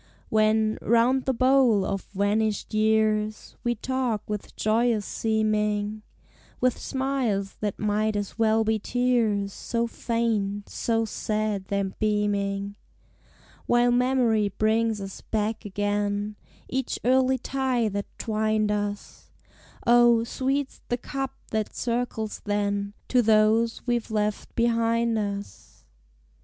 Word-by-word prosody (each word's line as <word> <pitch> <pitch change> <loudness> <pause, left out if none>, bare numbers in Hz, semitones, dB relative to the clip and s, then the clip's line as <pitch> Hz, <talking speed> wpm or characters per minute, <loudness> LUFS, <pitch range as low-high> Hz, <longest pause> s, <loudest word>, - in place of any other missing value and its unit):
When, 215 0 +2
round 240 +3 +3
the 265 - +1
bowl, 255 -5 +4
of 195 - -3
vanished 210 +2 0
years 215 0 +1
We 240 0 +1
talk 245 -2 -2
with 210 -1 -5
joyous 220 -1 +1
seeming, 215 -1 0 0.6
With 255 -1 +2
smiles 260 -8 -2
that 205 -2 -2
might 215 +1 0
as 205 -1 -3
well 220 0 +3
be 220 0 +1
tears, 225 -4 +1
So 235 0 -2
faint, 225 -4 -1
so 225 -1 0
sad 215 -2 -2
their 200 0 -1
beaming; 200 0 -1 0.9
While 240 0 +4
memory 245 -4 +2
brings 220 +2 +1
us 195 -1 -7
back 220 +1 -2
again 205 +1 -1 0.3
Each 260 -1 -2
early 260 +1 +4
tie 260 -2 0
that 200 0 -3
twined 215 -1 0
us, 205 0 -4 0.6
O, 240 -1 +5
sweet's 270 +3 -2
the 245 - +1
cup 270 +2 -4 0.2
that 215 -1 -2
circles 235 -2 -2
then 205 -1 -1 0.2
To 250 - +4
those 220 +1 +3
we've 240 -2 -1
left 210 -1 -2
behind 230 -1 +2
us! 200 -1 -6
220 Hz, 115 wpm, -26 LUFS, 205-235 Hz, 0.9 s, O